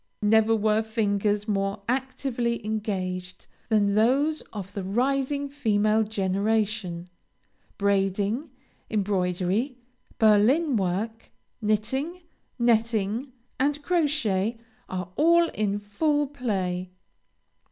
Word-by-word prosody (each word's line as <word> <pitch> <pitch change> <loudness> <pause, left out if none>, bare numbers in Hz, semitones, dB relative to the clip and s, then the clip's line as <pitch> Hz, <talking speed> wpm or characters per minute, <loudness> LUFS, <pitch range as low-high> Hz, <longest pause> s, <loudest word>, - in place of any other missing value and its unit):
Never 220 +1 +4
were 215 0 +2
fingers 210 -1 0
more 195 0 -1
actively 245 -2 -1
engaged 185 -4 -3 0.2
than 205 -2 +3
those 270 +9 +2
of 200 -2 -7
the 200 - -4
rising 275 +7 0
female 220 -6 +2
generation; 205 -3 -1 0.7
braiding, 200 - 0 0.4
embroidery, 195 +4 0 0.4
Berlin 235 +8 +4
work, 215 +4 -2 0.3
knitting, 265 - -1 0.3
netting, 230 +1 +1 0.3
and 290 +2 0
crochet, 245 - +1 0.3
are 180 -1 -4
all 335 +2 +5
in 205 -1 -1
full 290 +9 0
play. 190 -10 -2
215 Hz, 90 wpm, -26 LUFS, 200-255 Hz, 0.7 s, all